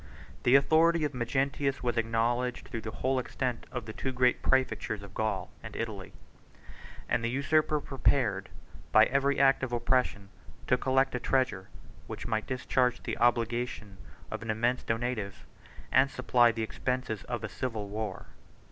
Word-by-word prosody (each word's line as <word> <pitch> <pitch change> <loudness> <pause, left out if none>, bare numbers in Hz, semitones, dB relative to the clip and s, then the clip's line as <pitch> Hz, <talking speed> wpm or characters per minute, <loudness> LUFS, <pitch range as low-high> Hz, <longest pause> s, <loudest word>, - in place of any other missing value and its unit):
The 125 - +5
authority 160 +4 +4
of 145 - -1
Magnentius 135 +3 -1
was 120 -1 0
acknowledged 115 +2 0
through 115 - -4
the 110 - -5 0.2
whole 130 0 +2
extent 125 -1 -3
of 125 -4 -4
the 110 - -7
two 130 - -3
great 125 -1 +2
præfectures 130 -5 0
of 100 -1 -11
Gaul 100 -4 -2
and 110 -2 -9
Italy; 105 -5 -5 1.0
and 120 -1 0
the 115 - +1
usurper 150 +4 +2
prepared, 120 -9 0 0.4
by 110 0 +7
every 140 +2 +1
act 135 0 +5
of 130 -2 -3
oppression, 120 -4 0 0.4
to - - +3
collect 130 +1 +1
a 125 - -1
treasure, 125 -8 0 0.4
which - - -6
might 110 -1 -1
discharge 125 -1 0
the - - -4
obligation 120 -3 0 0.3
of - - -4
an 115 - -7
immense 120 +3 +1
donative, 115 -3 -3 0.5
and 135 +2 +5
supply 125 -2 +3
the 115 -1 -3
expenses 125 -1 -2
of 120 -2 -4
a - - -1
civil 110 -2 -4
war. 105 -1 -5
120 Hz, 155 wpm, -30 LUFS, 110-130 Hz, 1.0 s, by